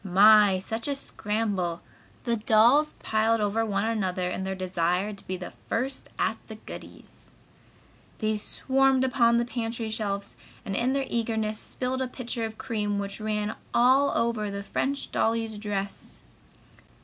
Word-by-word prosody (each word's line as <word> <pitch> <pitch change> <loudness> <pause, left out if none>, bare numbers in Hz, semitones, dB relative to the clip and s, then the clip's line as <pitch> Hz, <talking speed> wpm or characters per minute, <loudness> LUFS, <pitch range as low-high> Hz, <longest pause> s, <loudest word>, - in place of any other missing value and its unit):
My! 200 +1 +6
Such 225 +6 -4
a 285 - 0
scramble! 210 -8 -2 0.4
The 235 -1 +1
dolls 235 +7 +4
piled 220 +1 +2
over 210 +2 +1
one 205 -1 0
another 185 -5 -1
in 190 - -3
their 190 0 -2
desire 185 +2 0
to 200 - -11
be 185 - -2
the 180 - -8 0.2
first 260 +4 -2
at - - 0
the - - -8
goodies. - - -12 0.9
They 215 -1 0
swarmed 265 +4 +2
upon 235 -3 +3
the 235 - +1
pantry 230 -1 -3
shelves 200 -2 -3 0.3
and 195 - -3
in 245 +5 +1
their 275 -1 0
eagerness 220 -2 -1
spilled 255 +1 -3
a 260 - 0
pitcher 245 -2 -4
of 220 0 -7
cream 210 -2 -2
which 200 +1 -4
ran 215 0 -1 0.2
all 260 +4 +5
over 230 -3 0
the 200 0 -5
French 275 +7 -2
dolly's 225 -1 0
dress. 200 -2 -5
220 Hz, 150 wpm, -27 LUFS, 200-235 Hz, 0.9 s, My